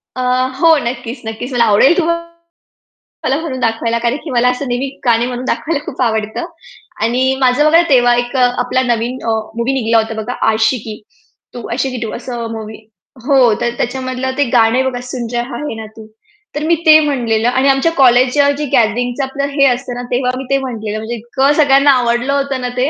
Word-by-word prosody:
अ, 255 - -3 0.4
हो 325 0 +5
नक्कीच, 240 +1 -5
नक्कीच. 220 +4 -6
मला 240 -1 +3
आवडेल 230 - +4
तुम्हाला 335 0 -4 0.8
म्हणून 275 -6 -5
दाखवायला, 230 0 0
कारण 235 +2 0
की 320 - -7
मला 245 0 +2
असं 250 +2 -3
नेहमी 245 +2 -2 0.2
गाणे 235 -1 +3
म्हणून 250 0 -5
दाखवायला 295 +2 -2
खूप 265 - -6
आवडतं. 220 +4 -1 0.6
आणि 255 +3 +1
माझं 260 +3 +3
बघा 325 +2 +5
तेव्हा 245 -3 +4
एक 245 +2 -2
आपला 250 0 +1
नवीन 240 0 -1
अ, - - -1 0.3
मूव्ही 235 +3 -1
निघाला 230 -3 +1
होता 225 0 0
बघा, 245 +3 -5 0.2
आशिकी 220 0 -1 0.5
तू 240 - -7
आशिकी 255 +1 -2
2 230 -2 -4
असं 240 -1 -5
मूव्ही 220 -1 -7 0.5
हो 275 0 +3 0.2
तर 240 - +1
त्याच्यामधलं 255 +1 -3
ते 285 - +3
गाणं 235 +2 +3
बघा, 245 -1 -5
सुन 250 -1 -5
रहा 240 +2 -3
आहे 295 -6 -5
ना 220 0 -7
तू. 220 - -10 0.5
तर 295 - -3
मी 335 +2 +2
ते 310 0 +8
म्हणलेलं 240 -7 0
आणि 260 +2 +1
आमच्या 270 +5 +2
कॉलेजच्या 265 0 +4
जे 300 - -2
गॅदरिंगचं 245 +4 +1
आपलं 270 +1 -4
हे 275 -1 +3
असत 250 +1 -1
ना, 245 - -5
तेव्हा 250 0 0
मी 265 - -5
ते 275 - +3
म्हटलेलं 220 -5 -4
म्हणजे 220 +2 -5
इतकं 265 +5 0
सगळ्यांना 280 -1 +5
आवडलं 245 +1 +1
होतं 275 -2 -1
ना 250 - -2
ते. 255 +3 +1
250 Hz, 190 wpm, -15 LUFS, 235-275 Hz, 0.8 s, ते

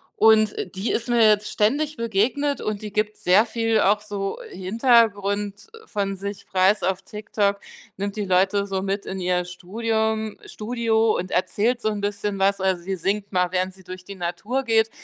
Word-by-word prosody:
Und 215 -1 +5 0.2
die 195 +5 -1
ist 235 - -1
mir 240 -1 +3
jetzt 210 -1 +4
ständig 290 +8 +1
begegnet 235 +6 0
und 210 -1 -3
die 210 -1 -6
gibt 215 +1 -1
sehr 190 +5 +4
viel 225 -1 0
auch 205 +2 +3
so 200 -2 -4
Hintergrund 205 -1 +1 0.2
von 195 - -2
sich 200 +1 -6
preis 190 +2 +2
auf 190 +1 0
TikTok, 210 -1 -1 0.4
nimmt 200 +2 -4
die 210 - -1
Leute 195 +2 +2
so 190 -1 -2
mit 195 +1 -2
in 190 0 -5
ihr 180 0 0
Studium 220 +4 -2
Studio 225 -1 0
und 185 +1 -4
erzählt 220 +6 +1
so 230 - -2
'n 210 -1 -3
bisschen 205 0 -2
was. 195 +1 +2
Also, 190 -2 0
sie 190 +1 -3
singt 195 +3 -2
mal, 180 -2 +1
während 185 +1 0
sie 190 -1 -17
durch 185 0 -8
die 200 +2 -9
Natur 180 +9 -2
geht 225 -2 +3
205 Hz, 180 wpm, -23 LUFS, 190-220 Hz, 0.4 s, Und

